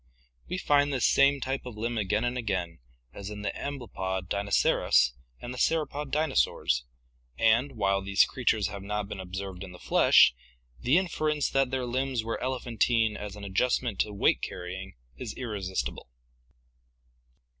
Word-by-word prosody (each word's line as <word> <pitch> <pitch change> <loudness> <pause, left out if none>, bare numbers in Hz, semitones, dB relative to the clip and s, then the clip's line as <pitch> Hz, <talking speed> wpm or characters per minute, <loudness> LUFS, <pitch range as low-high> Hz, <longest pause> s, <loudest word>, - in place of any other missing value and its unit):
We 180 - -2
find 145 -4 +3
this 130 -4 +1
same 140 +1 +4
type 135 +1 -2
of 125 -4 -8
limb 115 +1 -2
again 105 +2 0
and 120 0 -1
again, 95 -8 -2 0.3
as 100 0 -7
in 105 -1 -7
the - - -1
amblypod 95 -9 -4
Dinoceras 100 -10 +3 0.3
and 120 - -6
the 125 - -7
sauropod 150 -3 0
dinosaurs, 150 - +1 0.5
and, 120 +5 +3
while 100 -3 +1
these 95 0 +4
creatures 110 -5 0
have 100 0 -7
not 105 +1 -3
been 100 -1 -7
observed 95 0 -6
in 95 -2 -9
the - - -11
flesh, 60 - +5 0.5
the 130 +7 +3
inference 155 -5 0
that 135 -1 +2
their 130 -1 -2
limbs 130 -1 -1
were 115 0 -4
elephantine 120 -3 +1
as 105 -1 -6
an 105 - -10
adjustment 110 +2 0
to 105 - +1
weight 100 - +2
carrying 95 0 -6 0.2
is - - -6
irresistible. 100 - -4
110 Hz, 155 wpm, -28 LUFS, 100-130 Hz, 0.5 s, flesh